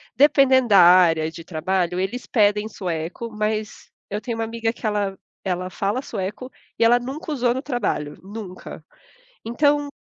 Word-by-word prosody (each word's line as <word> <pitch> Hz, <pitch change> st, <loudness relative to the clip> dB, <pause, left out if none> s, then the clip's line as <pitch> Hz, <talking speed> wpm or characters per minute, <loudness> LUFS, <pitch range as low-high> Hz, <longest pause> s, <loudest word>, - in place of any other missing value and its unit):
dependendo 265 Hz, -3 st, +4 dB
da 200 Hz, -2 st, +7 dB
área 170 Hz, -3 st, +6 dB
de 165 Hz, -, -10 dB
trabalho, 180 Hz, +2 st, -1 dB
eles 200 Hz, +7 st, -3 dB
pedem 210 Hz, -2 st, +2 dB
sueco, 180 Hz, +2 st, -5 dB
mas 215 Hz, 0 st, -3 dB, 0.2 s
eu 205 Hz, -, -3 dB
tenho 230 Hz, +1 st, -5 dB
uma 225 Hz, -, -1 dB
amiga 225 Hz, 0 st, -2 dB
que 235 Hz, -, -10 dB
ela 205 Hz, -2 st, -1 dB, 0.3 s
ela 180 Hz, 0 st, -2 dB
fala 200 Hz, +6 st, -2 dB
sueco 215 Hz, +2 st, -5 dB, 0.3 s
e -, -, +2 dB
ela 235 Hz, +1 st, +6 dB
nunca 275 Hz, +6 st, -6 dB
usou 245 Hz, -4 st, +1 dB
no 260 Hz, -, -3 dB
trabalho, 230 Hz, -, -2 dB
nunca. 195 Hz, -2 st, -9 dB, 0.6 s
Então, 290 Hz, +5 st, +1 dB
215 Hz, 155 wpm, -22 LUFS, 185-245 Hz, 0.6 s, da